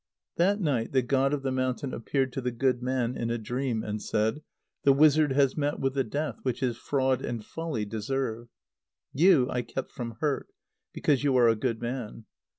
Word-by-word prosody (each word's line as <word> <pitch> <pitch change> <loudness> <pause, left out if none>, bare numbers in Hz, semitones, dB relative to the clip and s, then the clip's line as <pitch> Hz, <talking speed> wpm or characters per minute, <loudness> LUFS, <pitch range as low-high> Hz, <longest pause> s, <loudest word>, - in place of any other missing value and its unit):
That 195 +4 +3
night 135 - 0
the 130 -2 +3
god 135 +2 +2
of 145 -2 -2
the 135 - 0
mountain 130 +1 -1
appeared 130 +2 -1
to 135 - -3
the 125 - -1
good 125 +1 0
man 125 -1 -1
in 115 - -2
a 120 - 0
dream, 120 0 -2
and 105 0 -4
said: 110 +7 0 0.4
"The 140 - +5
wizard 150 0 +5
has 135 -1 +3
met 145 -1 -1
with 135 0 0
the 135 -1 +1
death 145 +6 -3
which 130 -1 -2
his 125 -3 0
fraud 130 +1 0
and 115 -3 -4
folly 160 -10 -3
deserve. 115 +2 -3 0.7
You 155 -4 +5
I 125 - 0
kept 130 +2 -5
from 115 -3 -6
hurt, 145 -3 -1 0.4
because 145 -2 +1
you 135 -3 +3
are 120 -2 +6
a 115 - +3
good 115 0 -2
man. 120 -2 -5
130 Hz, 195 wpm, -28 LUFS, 120-140 Hz, 0.7 s, are